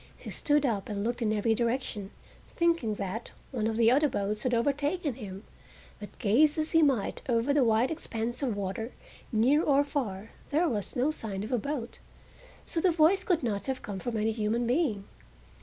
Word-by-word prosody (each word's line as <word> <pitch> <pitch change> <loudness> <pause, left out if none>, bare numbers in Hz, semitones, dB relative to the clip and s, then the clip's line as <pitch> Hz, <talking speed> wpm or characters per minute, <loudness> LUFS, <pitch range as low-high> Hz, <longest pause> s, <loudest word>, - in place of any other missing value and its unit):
He - - -9
stood 295 -1 +2
up 215 -6 -1
and 200 -1 -2
looked 240 +2 -2
in 215 -2 +1
every 215 +1 +2
direction, 230 -4 -2 0.4
thinking 335 -11 +1
that 200 +4 -5 0.2
one 225 -4 -1
of 225 0 -1
the 230 0 +5
other 290 +3 +4
boats 210 -3 -2
had 255 - 0
overtaken 285 +6 0
him, 200 -4 -8 0.6
but 205 - -10
gaze 275 +8 +3
as 310 0 -1
he 325 - +5
might 270 -9 +1
over 240 +4 +2
the 285 -2 +4
wide 230 +3 +3
expanse 240 -6 -3
of 245 -7 -1
water, 200 +4 -4 0.4
near 255 +7 +4
or 285 -3 +3
far 225 -9 -4 0.2
there 325 +4 +2
was 215 - -2
no 265 +4 +2
sign 205 -9 -4
of 215 - -6
a 245 - +2
boat, 260 -1 -4 0.7
so 330 - -1
the 370 - +4
voice 335 +4 +4
could 350 -7 +1
not 210 -2 -2
have 265 -1 -3
come 200 -2 -5
from 230 +3 -3
any 215 +1 +1
human 220 +2 0
being. 245 - +1
240 Hz, 190 wpm, -29 LUFS, 215-290 Hz, 0.7 s, the